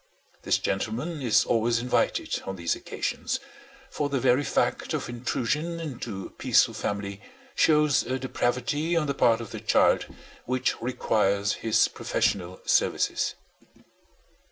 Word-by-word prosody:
This -, -, +2 dB
gentleman 125 Hz, -, -2 dB
is 120 Hz, -5 st, +3 dB
always 115 Hz, 0 st, +2 dB
invited 125 Hz, +2 st, 0 dB
on 95 Hz, -, -3 dB
these 85 Hz, -2 st, -1 dB
occasions, -, -, -3 dB, 0.5 s
for 145 Hz, -1 st, -1 dB
the 135 Hz, -1 st, 0 dB
very 130 Hz, +2 st, +3 dB
fact -, -, 0 dB
of -, -, -3 dB
intrusion 130 Hz, +7 st, -2 dB
into 120 Hz, -, -5 dB
a -, -, -8 dB
peaceful 125 Hz, -1 st, +3 dB
family 100 Hz, -2 st, -4 dB, 0.3 s
shows 150 Hz, -3 st, +4 dB
a 130 Hz, +2 st, -2 dB
depravity 130 Hz, +6 st, -1 dB
on 160 Hz, -, +2 dB
the 140 Hz, -, -1 dB
part 115 Hz, -4 st, +3 dB
of 115 Hz, -, -8 dB
the -, -, -5 dB
child -, -, +3 dB, 0.4 s
which 130 Hz, 0 st, -1 dB
requires 105 Hz, -5 st, +1 dB
his 110 Hz, -1 st, +3 dB
professional 90 Hz, -2 st, -1 dB
services. -, -, +1 dB
120 Hz, 130 wpm, -26 LUFS, 110-140 Hz, 0.5 s, shows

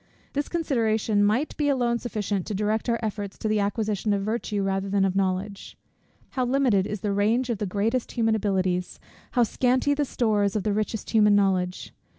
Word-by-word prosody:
This 285 Hz, +1 st, -2 dB
consideration 225 Hz, -10 st, +1 dB
might 225 Hz, +9 st, +1 dB
be 295 Hz, -1 st, +1 dB
alone 240 Hz, -3 st, +1 dB
sufficient 205 Hz, -5 st, -3 dB
to 210 Hz, -, -3 dB
direct 215 Hz, +4 st, -1 dB
our 235 Hz, -, +2 dB
efforts 205 Hz, -2 st, -4 dB
to -, -, -3 dB
the 215 Hz, 0 st, +1 dB
acquisition 205 Hz, 0 st, 0 dB
of 200 Hz, -1 st, -1 dB
virtue 215 Hz, -1 st, -2 dB
rather 195 Hz, 0 st, -1 dB
than 195 Hz, 0 st, +2 dB
of 190 Hz, -1 st, -1 dB
knowledge. 195 Hz, +1 st, -2 dB, 0.5 s
How 260 Hz, -, -1 dB
limited 245 Hz, -7 st, +2 dB
is 210 Hz, -2 st, -5 dB
the 205 Hz, -1 st, -1 dB
range 225 Hz, +5 st, +1 dB
of 220 Hz, -, -3 dB
the 210 Hz, -, -2 dB
greatest 220 Hz, +6 st, -1 dB
human 225 Hz, -2 st, +2 dB
abilities! 190 Hz, -4 st, -1 dB, 0.3 s
how 245 Hz, -, +4 dB
scanty 255 Hz, +5 st, +1 dB
the 290 Hz, +1 st, 0 dB
stores 210 Hz, -6 st, 0 dB
of 210 Hz, -, 0 dB
the 210 Hz, -, 0 dB
richest 215 Hz, 0 st, -3 dB
human 210 Hz, -2 st, +5 dB
knowledge! 185 Hz, -2 st, 0 dB
210 Hz, 185 wpm, -25 LUFS, 200-235 Hz, 0.5 s, human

